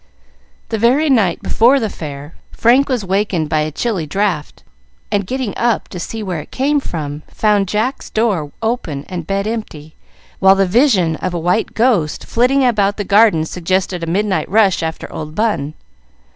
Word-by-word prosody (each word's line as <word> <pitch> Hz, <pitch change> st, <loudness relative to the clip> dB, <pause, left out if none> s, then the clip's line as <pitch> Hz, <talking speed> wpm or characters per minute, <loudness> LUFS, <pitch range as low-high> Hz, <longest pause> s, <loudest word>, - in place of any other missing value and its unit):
The 225 Hz, -, -2 dB
very 270 Hz, +7 st, +3 dB
night 200 Hz, -9 st, +2 dB
before 250 Hz, +5 st, +4 dB
the 225 Hz, -, -1 dB
Fair, 145 Hz, -5 st, -8 dB, 0.2 s
Frank 255 Hz, +5 st, +3 dB
was 245 Hz, -6 st, -1 dB
wakened 190 Hz, -5 st, 0 dB
by 155 Hz, -, +1 dB
a 155 Hz, 0 st, -1 dB
chilly 185 Hz, -2 st, -2 dB
draught, 185 Hz, -3 st, -2 dB, 0.5 s
and, 200 Hz, -2 st, 0 dB
getting 255 Hz, -3 st, -3 dB
up 235 Hz, -2 st, 0 dB
to 180 Hz, -, -7 dB
see 220 Hz, +5 st, -5 dB
where 180 Hz, -5 st, -3 dB
it -, -, -10 dB
came 285 Hz, +3 st, +1 dB
from, 150 Hz, -, -5 dB
found 210 Hz, -2 st, +1 dB
Jack's 220 Hz, +8 st, -2 dB
door 200 Hz, -10 st, 0 dB
open 200 Hz, -, -2 dB
and 175 Hz, -4 st, -5 dB
bed 195 Hz, 0 st, -1 dB
empty, 185 Hz, -9 st, -5 dB, 0.5 s
while 190 Hz, 0 st, +6 dB
the 195 Hz, 0 st, +2 dB
vision 190 Hz, -, +2 dB
of 185 Hz, -1 st, -3 dB
a -, -, -1 dB
white 180 Hz, +6 st, 0 dB
ghost 220 Hz, -11 st, +1 dB
flitting 260 Hz, +3 st, +2 dB
about 205 Hz, -4 st, +1 dB
the 205 Hz, -, -2 dB
garden 200 Hz, -5 st, +4 dB
suggested 180 Hz, +1 st, -2 dB
a 165 Hz, -, -4 dB
midnight 195 Hz, +3 st, 0 dB
rush 200 Hz, -2 st, +3 dB
after 160 Hz, 0 st, -4 dB
old 155 Hz, 0 st, -6 dB
Bun. 205 Hz, -10 st, -1 dB
195 Hz, 170 wpm, -17 LUFS, 165-230 Hz, 0.5 s, while